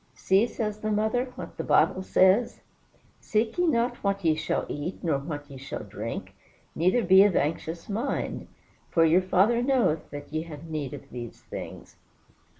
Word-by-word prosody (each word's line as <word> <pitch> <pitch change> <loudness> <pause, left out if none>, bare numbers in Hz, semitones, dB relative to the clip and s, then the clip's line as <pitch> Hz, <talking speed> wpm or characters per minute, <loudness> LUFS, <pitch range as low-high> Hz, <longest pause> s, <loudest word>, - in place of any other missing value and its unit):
"See," 195 +5 +3
says 215 -3 -3
the 215 - -2
mother, 220 +4 +1
"what - - -8
the - - -3
Bible 185 - +3
says: 190 +5 +3 0.6
'Seek 220 +8 -1
ye 355 - +3
not 240 -4 +1
what 200 -2 -2
ye 160 - +5
shall 160 +1 -1
eat, 150 +8 -5
nor 155 -5 +1
what 145 0 -6
ye 140 -2 -10
shall 135 -2 -6
drink, 105 +2 -6 0.4
neither 185 +9 +2
be 190 +1 +7
of 205 -3 +3
anxious 160 +2 -2
mind. 230 +7 -3 0.4
For 165 -1 +4
your 165 +3 +5
Father 195 +6 +3
knoweth 245 - +1
that 145 +1 -9
ye 155 - 0
have 160 -1 -9
need 150 -4 -4
of 140 - -13
these 120 -2 -8
things.'" - - -9
185 Hz, 170 wpm, -27 LUFS, 155-215 Hz, 0.6 s, be